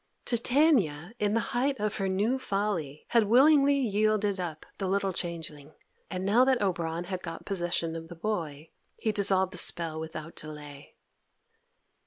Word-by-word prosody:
Titania, 235 - +2
in 210 +1 +1
the - - +3
height 265 +1 +1
of 210 0 -1
her 195 - -1
new 210 +8 +1
folly, 195 - -2
had 230 -2 +4
willingly 280 +5 +5
yielded 215 -4 +1
up 165 -4 -5
the 195 - -1
little 195 0 0
changeling, 155 -4 -6 0.3
and 185 0 -4
now 220 +6 +5
that 260 -1 +3
Oberon 170 -4 -1
had 180 0 -5
got 165 -1 -7
possession 175 -3 -2
of 165 0 -7
the 175 - -10
boy 165 -6 -4 0.3
he 220 - 0
dissolved 190 -2 +2
the 180 - -3
spell 165 -3 +2
without 160 0 -7
delay. 150 -2 -10
190 Hz, 155 wpm, -28 LUFS, 165-215 Hz, 0.3 s, willingly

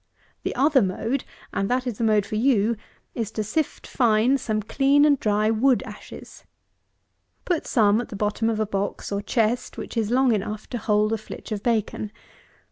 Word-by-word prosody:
The - - -3
other 275 +1 +4
mode, 225 +7 -1 0.3
and 195 0 -1
that 250 +1 0
is 240 -5 -4
the - - 0
mode 215 -2 +3
for - - -9
you, 225 -1 +2 0.4
is, 225 -4 -3
to 215 - -1
sift 285 +8 -2
fine 240 +2 +2
some 215 -3 -2
clean 280 +6 +3
and 285 -3 +4
dry 215 +1 +2
wood 245 +3 +3
ashes. - - -11 1.0
Put 350 -3 -1
some 215 -2 +3
at 245 - -8
the - - -7
bottom 210 +2 0
of 220 -1 -1
a 215 - +1
box, 200 0 -3
or 200 0 -1
chest, 230 +2 0
which - - -7
is 220 -3 0
long 255 +1 +3
enough 210 +1 -3
to 240 - -2
hold 210 +1 +2
a 225 - -1
flitch 215 - -10
of 210 -2 -2
bacon. 215 -2 -1
220 Hz, 190 wpm, -24 LUFS, 210-250 Hz, 1.0 s, other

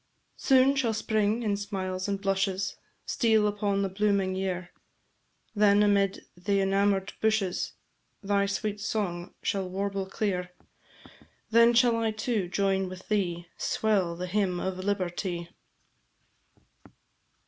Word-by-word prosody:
Soon 265 +1 +4
shall 235 -5 +1
Spring, 220 +1 0
in 210 -2 +1
smiles 190 -2 -3
and 200 -1 -1
blushes, 195 -1 -1 0.3
Steal 220 -3 +2
upon 205 -1 0
the - - +1
blooming 195 -1 +1
year; 185 -2 -3 0.8
Then, 205 -1 +4
amid 200 -1 +2
the 195 +3 0
enamour'd 195 0 +1
bushes, 215 -4 0 0.5
Thy 200 0 +1
sweet 205 +1 -2
song 185 -5 -3
shall 190 -2 -1
warble 195 0 -2
clear: 185 -3 -2 1.0
Then 235 +1 +6
shall 235 -1 +4
I, 225 -1 +1
too, 215 -3 -1
join 195 0 0
with 185 0 -11
thee 175 -5 0
Swell 195 -6 0
the 180 +2 -4
hymn 180 -1 0
of 185 0 -3
Liberty. 180 -3 -2
200 Hz, 120 wpm, -28 LUFS, 185-210 Hz, 1.0 s, Then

